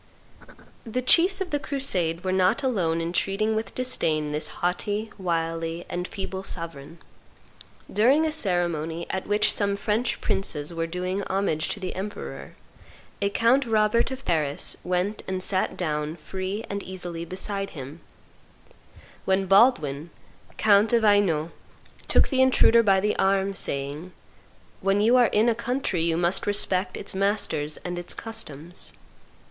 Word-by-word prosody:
The 250 Hz, +2 st, -3 dB
chiefs 355 Hz, +9 st, +5 dB
of 370 Hz, -, -3 dB
the 290 Hz, -, 0 dB
crusade 180 Hz, -, -1 dB
were 185 Hz, -, -1 dB
not 190 Hz, +8 st, +2 dB
alone 180 Hz, -11 st, 0 dB
in 165 Hz, +1 st, -3 dB
treating 215 Hz, +4 st, 0 dB
with 220 Hz, +1 st, -4 dB
disdain 160 Hz, -12 st, 0 dB
this 150 Hz, +1 st, 0 dB
haughty, 205 Hz, +5 st, -2 dB
wily, 165 Hz, -1 st, -2 dB
and 180 Hz, +1 st, -3 dB
feeble 190 Hz, -1 st, -5 dB
sovereign. 165 Hz, -4 st, -6 dB, 1.0 s
During 265 Hz, +9 st, +4 dB
a 315 Hz, -, 0 dB
ceremony 170 Hz, -, -1 dB
at 190 Hz, -, -4 dB
which 205 Hz, +1 st, +3 dB
some 200 Hz, -1 st, +1 dB
French 220 Hz, +4 st, -1 dB
princes 175 Hz, -7 st, -1 dB
were 165 Hz, 0 st, -2 dB
doing 180 Hz, +3 st, -3 dB
homage 185 Hz, -5 st, -1 dB
to -, -, -3 dB
the 185 Hz, -2 st, -4 dB
emperor, 200 Hz, +3 st, -7 dB, 0.7 s
a 200 Hz, -, +2 dB
Count 235 Hz, +6 st, +2 dB
Robert 220 Hz, +1 st, +2 dB
of 265 Hz, 0 st, -7 dB
Paris 150 Hz, -4 st, 0 dB
went 180 Hz, +4 st, -1 dB
and 185 Hz, -1 st, -2 dB
sat 190 Hz, -1 st, -1 dB
down 150 Hz, -2 st, -2 dB
free 190 Hz, +6 st, -5 dB
and 200 Hz, 0 st, -4 dB
easily 175 Hz, -3 st, -6 dB
beside 195 Hz, +3 st, -4 dB
him; 140 Hz, +5 st, -8 dB, 1.2 s
when 190 Hz, 0 st, +2 dB
Baldwin, 180 Hz, -, +3 dB, 0.5 s
count 215 Hz, +2 st, +4 dB
of 230 Hz, -1 st, +3 dB
Hainault, 185 Hz, -7 st, +3 dB, 0.6 s
took -, -, +4 dB
the 265 Hz, -2 st, +2 dB
intruder 245 Hz, -3 st, +5 dB
by 195 Hz, -3 st, +3 dB
the 210 Hz, +2 st, 0 dB
arm, 195 Hz, 0 st, +2 dB
saying, 145 Hz, +1 st, -3 dB, 0.7 s
"When 195 Hz, +1 st, +1 dB
you 225 Hz, +4 st, +4 dB
are 245 Hz, -2 st, +5 dB
in 215 Hz, +3 st, +2 dB
a 235 Hz, -, +4 dB
country 235 Hz, -5 st, -2 dB
you 165 Hz, 0 st, +1 dB
must 175 Hz, +4 st, +1 dB
respect 190 Hz, -2 st, 0 dB
its 200 Hz, -, -3 dB
masters 190 Hz, -7 st, -1 dB
and 175 Hz, 0 st, -3 dB
its 175 Hz, -, -2 dB
customs." 175 Hz, -7 st, -3 dB
190 Hz, 145 wpm, -25 LUFS, 170-215 Hz, 1.2 s, chiefs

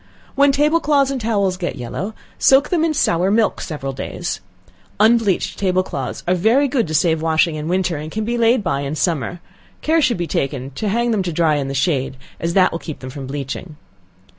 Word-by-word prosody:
When 280 Hz, 0 st, +4 dB
table 300 Hz, +4 st, +3 dB
cloths 285 Hz, -3 st, +2 dB
and 265 Hz, -2 st, -3 dB
towels 200 Hz, -4 st, 0 dB
get 180 Hz, -2 st, -3 dB
yellow, 165 Hz, -, -5 dB, 0.2 s
soak 270 Hz, +2 st, +5 dB
them 340 Hz, -3 st, +1 dB
in 330 Hz, -, +2 dB
sour 180 Hz, -6 st, +2 dB
milk 220 Hz, +2 st, +2 dB
several 135 Hz, -4 st, -4 dB
days. -, -, -4 dB, 0.6 s
Unbleached 220 Hz, -3 st, +2 dB
table 185 Hz, -1 st, +2 dB
cloths 135 Hz, -8 st, -5 dB
are 180 Hz, -, +3 dB
very 225 Hz, +10 st, +3 dB
good 250 Hz, -7 st, 0 dB
to 155 Hz, -, -3 dB
save 160 Hz, +1 st, +2 dB
washing 160 Hz, +1 st, +2 dB
in 155 Hz, 0 st, -4 dB
winter, 180 Hz, -2 st, 0 dB
and 155 Hz, +2 st, -6 dB
can 220 Hz, 0 st, -3 dB
be 235 Hz, +2 st, -1 dB
laid 235 Hz, -1 st, +3 dB
by 140 Hz, -6 st, -1 dB
in 140 Hz, +2 st, -3 dB
summer, 165 Hz, 0 st, -1 dB, 0.4 s
care 320 Hz, +1 st, +3 dB
should 250 Hz, -7 st, +2 dB
be 175 Hz, -, -2 dB
taken 135 Hz, -3 st, -2 dB
to 205 Hz, +10 st, -3 dB
hang 235 Hz, +3 st, +1 dB
them 215 Hz, -3 st, +1 dB
to 180 Hz, -2 st, -2 dB
dry 155 Hz, -2 st, +2 dB
in 140 Hz, -2 st, -2 dB
the 135 Hz, -, -4 dB
shade, 135 Hz, -3 st, 0 dB, 0.2 s
as 170 Hz, +1 st, -2 dB
that 185 Hz, -1 st, +5 dB
will 165 Hz, -, -4 dB
keep 155 Hz, -4 st, -7 dB
them 130 Hz, 0 st, -8 dB
from 135 Hz, 0 st, -7 dB
bleaching. 145 Hz, +4 st, -5 dB
180 Hz, 215 wpm, -19 LUFS, 155-230 Hz, 0.6 s, soak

